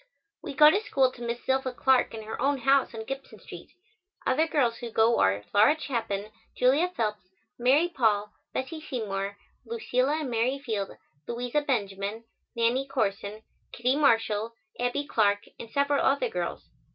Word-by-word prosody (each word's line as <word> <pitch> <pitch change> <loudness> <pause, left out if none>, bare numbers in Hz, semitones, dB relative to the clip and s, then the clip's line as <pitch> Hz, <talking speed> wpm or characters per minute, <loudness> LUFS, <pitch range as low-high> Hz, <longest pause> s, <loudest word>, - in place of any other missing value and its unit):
We - - -7
go 300 +2 +8
to 405 - +1
school 265 -10 +2
to 245 - -14
Miss 235 0 -4
Zilpha 265 -1 0
Clark 260 -3 +3
in 220 - -7
her 215 - -6
own 280 +2 +2
house 270 -2 +3
on 220 - -5
Gibson 270 +2 -7
Street. - - -11 0.6
Other 310 +5 +2
girls 245 -7 +1
who 240 - -6
go 225 +1 +3
are 100 +2 +2
Laura 220 +10 +5
Chapin, 215 -7 -3 0.3
Julia 280 +8 +3
Phelps, 210 -4 -2 0.3
Mary 270 +8 +4
Paul, 215 -10 +1 0.2
Bessie 310 +5 -4
Seymour, 200 -7 -4 0.3
Lucilla 305 - 0
and 270 -5 -4
Mary 240 +4 +1
Field, 220 -8 -3 0.4
Louisa 245 +4 -1
Benjamin, 205 -5 -2 0.3
Nannie 240 +4 +1
Corson, 210 -4 -2 0.3
Kittie 250 +3 +1
Marshall, 225 -5 +2 0.2
Abbie 245 +4 -1
Clark 205 -5 +2 0.2
and 230 - -8
several 280 +2 +1
other 280 - +2
girls. 455 - -4
245 Hz, 155 wpm, -27 LUFS, 220-275 Hz, 0.6 s, go